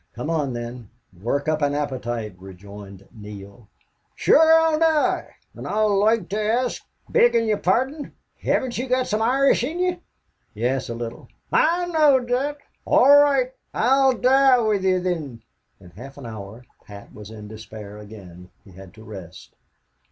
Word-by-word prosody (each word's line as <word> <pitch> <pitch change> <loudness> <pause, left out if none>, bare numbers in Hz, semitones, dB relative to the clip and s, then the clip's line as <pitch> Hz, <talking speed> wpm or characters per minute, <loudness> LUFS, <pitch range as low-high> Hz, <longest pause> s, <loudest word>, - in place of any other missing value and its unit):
"Come 125 +7 -4
on, 145 -5 -1
then, 120 -2 -7 0.3
work 140 +7 -2
up 155 0 0
an 145 0 +1
appetite," 120 -7 -4
rejoined 100 +1 -12
Neale. 105 0 -12 0.5
"Shure 320 +1 +4
I'll 320 -1 +1
die.... 320 -2 +1 0.2
An' - - -8
I'd 215 +1 0
loike 210 -1 +2
to 210 +2 -2
ask, 235 +4 -1 0.2
beggin' 470 - +3
ye're 215 -2 +1
pardon, 265 - -1 0.3
hevn't 245 -3 -1
ye 255 - -3
got 255 0 +1
some 215 -2 -2
Irish 265 +2 +2
in 305 +7 -3
ye?" 360 -1 0 0.6
"Yes, 125 +4 -2
a 115 - -4
little." 115 0 -7 0.2
"I 345 +3 +2
knowed 295 -7 +3
thot.... 275 +4 -1 0.3
All - - +3
roight, 280 -3 +4 0.2
I'll 265 +3 +3
die 265 +2 +4
with 210 -4 0
ye, 185 -1 +2
thin." 155 -10 -4 0.4
In 90 -2 -16
half 135 +9 -12
an 140 - -10
hour 110 +1 -9 0.2
Pat 100 -1 -13
was 105 -1 -11
in 105 -1 -10
despair 110 -1 -10
again. 95 -4 -13
He 95 - -17
had 95 +2 -14
to 110 - -14
rest. 95 -5 -11
150 Hz, 160 wpm, -22 LUFS, -, 0.6 s, Shure